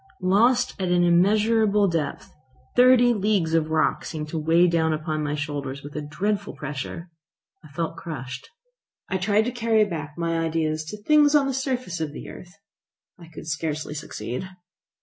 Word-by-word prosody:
Lost 240 +7 +3
at 185 - 0
an 175 0 +3
immeasurable 210 +4 +3
depth! 165 -5 -3 0.4
Thirty 245 -1 +6
leagues 200 -6 0
of 160 -1 +2
rock 155 0 +1
seemed 150 -1 -5
to 160 - -3
weigh 165 +3 +4
upon 160 -2 0
my 150 0 -1
shoulders 145 -2 -4
with 145 +1 -10
a 150 - -2
dreadful 200 +7 -2
pressure. 150 +4 -6 0.5
I - - -13
felt 165 +3 -4
crushed. 130 -6 -7 0.6
I 190 - 0
tried 205 +3 +2
to 245 - -1
carry 225 -3 +2
back 155 -5 -6
my 165 -1 -1
ideas 160 -1 -1
to 185 +7 -7
things 300 +2 +5
on 290 -2 +5
the 270 - -1
surface 255 - -2
of 150 -2 -3
the - - -8
earth. 180 +1 -12 0.6
I 170 - -13
could 160 -1 -11
scarcely 155 -1 -3
succeed. 135 - -6
170 Hz, 165 wpm, -24 LUFS, 155-210 Hz, 0.6 s, Thirty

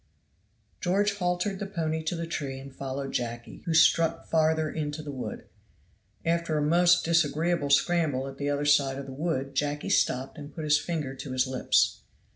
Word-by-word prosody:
George 200 +3 +1
haltered 180 +1 -1
the 205 - -4
pony 160 -5 -2
to 165 - -1
the 170 0 -3
tree 140 -5 -4
and 135 0 -11
followed 135 0 -4
Jacky, 120 0 -4
who 165 - +1
struck 165 +1 +4
farther 160 -1 +2
into 150 0 -4
the 145 - -6
wood. 130 -3 -6 0.8
After 165 -1 +1
a - - +1
most 175 +3 +4
disagreeable 165 -1 +1
scramble 140 -2 +2
at 135 0 -9
the 145 0 -1
other 145 0 -1
side 140 -2 +3
of 140 - -6
the 135 - -8
wood 140 -2 -2
Jacky 145 +1 -1
stopped 130 +5 +1
and 145 0 -10
put 160 - -5
his 150 0 +4
finger 155 -6 -3
to 135 0 -7
his 130 0 +2
lips. 130 -1 +1
150 Hz, 180 wpm, -28 LUFS, 135-165 Hz, 0.8 s, struck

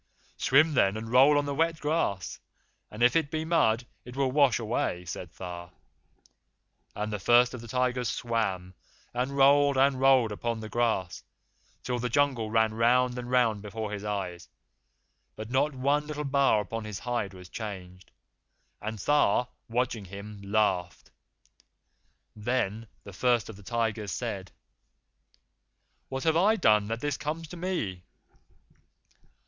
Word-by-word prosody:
'Swim, 155 +4 +4
then, 100 -6 +3
and 110 +1 -6
roll 135 +4 +6
on 145 - +1
the 140 - -2
wet 165 +2 0
grass, 145 - -1 0.5
and 110 +3 -3
if 125 - +5
it 160 -3 +2
be 155 +1 -3
mud 130 -9 +2 0.2
it 125 +1 -11
will 135 -1 +1
wash 140 -2 +4
away,' 105 -6 -2
said 80 - -7
Tha; 85 -1 -8 1.3
and 105 +1 -3
the 105 - -2
First 120 +5 +4
of 125 - -7
the 115 - -10
Tigers 125 0 0
swam, 100 -6 -2 0.4
and 130 +3 -2
rolled 140 0 +5
and 135 0 +3
rolled 130 -4 +4
upon 115 +2 -3
the 110 0 -7
grass, 110 -6 -1 0.6
till 125 -1 -2
the 125 +1 -2
Jungle 130 -4 +1
ran 110 0 +2
round 125 +2 +3
and 120 0 -6
round 120 -5 +2
before 105 +1 -5
his 105 -1 -5
eyes, 95 -4 -4 0.9
but 110 +2 -8
not 140 +2 +1
one 140 +3 +1
little 150 -1 -4
bar 140 -6 +3
upon 105 +3 -5
all 110 - -8
his 105 -3 -5
hide 120 -5 -3
was 90 -1 -11
changed, 90 -3 -8 0.7
and 110 +1 -4
Tha, 125 0 +2 0.2
watching 115 -3 -1
him, 100 +2 -9
laughed. 100 -4 -1 1.2
Then 110 -1 -2 0.2
the 100 - -11
First 120 +2 +1
of 110 - -8
the 100 - -14
Tigers 110 -1 -2
said: 100 -5 -4 1.6
'What 135 0 -4
have 160 -1 +2
I 205 +6 +4
done 105 - +3
that 115 +2 -3
this 145 -2 -1
comes 160 +2 -4
to 180 - -8
me? 165 - -3
120 Hz, 155 wpm, -28 LUFS, 105-135 Hz, 1.6 s, roll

